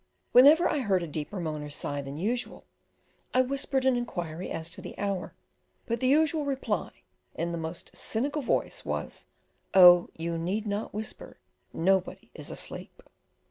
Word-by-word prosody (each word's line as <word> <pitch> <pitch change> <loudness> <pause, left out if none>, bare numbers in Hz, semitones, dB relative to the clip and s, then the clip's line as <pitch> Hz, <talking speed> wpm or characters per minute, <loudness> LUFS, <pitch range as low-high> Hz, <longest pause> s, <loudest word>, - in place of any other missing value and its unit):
Whenever 295 +8 +7
I 295 - 0
heard 195 -8 +1
a - - -4
deeper 155 +6 -5
moan 155 -3 -3
or 150 - -6
sigh 145 0 -3
than 140 +1 -7
usual, 235 +8 -3 0.7
I 255 - +6
whispered 270 0 -1
an 260 -1 +4
inquiry 175 -8 -4
as 165 +1 -5
to - - -7
the - - -9
hour, 200 -2 -3 0.5
but 235 -1 -2
the 255 - +1
usual 310 +2 +3
reply, 265 -8 -3 0.3
in 170 +1 -2
the 170 - -3
most 160 +1 -7
cynical 285 +7 -2
voice, 250 - -1
was, - - -4 0.5
"Oh, 175 -2 +9
you 165 0 -2
need 195 +6 -2
not 205 +1 -3
whisper, 215 +1 -6 0.3
nobody 190 +2 0
is - - -7
asleep." - - -6
200 Hz, 160 wpm, -28 LUFS, 170-255 Hz, 0.7 s, Oh